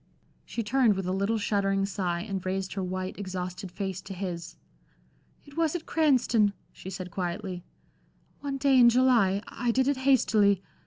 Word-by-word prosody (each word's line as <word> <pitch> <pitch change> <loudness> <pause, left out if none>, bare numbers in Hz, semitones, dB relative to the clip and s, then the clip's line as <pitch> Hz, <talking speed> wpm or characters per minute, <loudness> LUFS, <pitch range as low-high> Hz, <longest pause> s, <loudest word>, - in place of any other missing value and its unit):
She 230 - -4
turned 230 -1 +3
with 190 -1 -3
a 185 - -1
little 200 +4 0
shuddering 195 -2 +1
sigh 180 -3 -2
and 195 -2 -4
raised 190 0 -2
her 195 - -3
white, 185 +1 -4
exhausted 185 -1 -5
face 190 -1 -4
to 195 0 -8
his. 175 -3 -5 0.9
"It 285 -1 -15
was 330 -1 +1
at 335 - -4
Cranston," 245 -9 +3 0.2
she 190 - -10
said, 185 -1 -6
quietly, 180 0 -4 0.8
"one 280 -1 -3
day 270 -1 +4
in 240 -1 +8
July. 235 -6 +3
I 245 - -3
did 260 +3 +2
it 285 -1 +1
hastily. 215 -7 +3
200 Hz, 165 wpm, -28 LUFS, 185-250 Hz, 0.9 s, in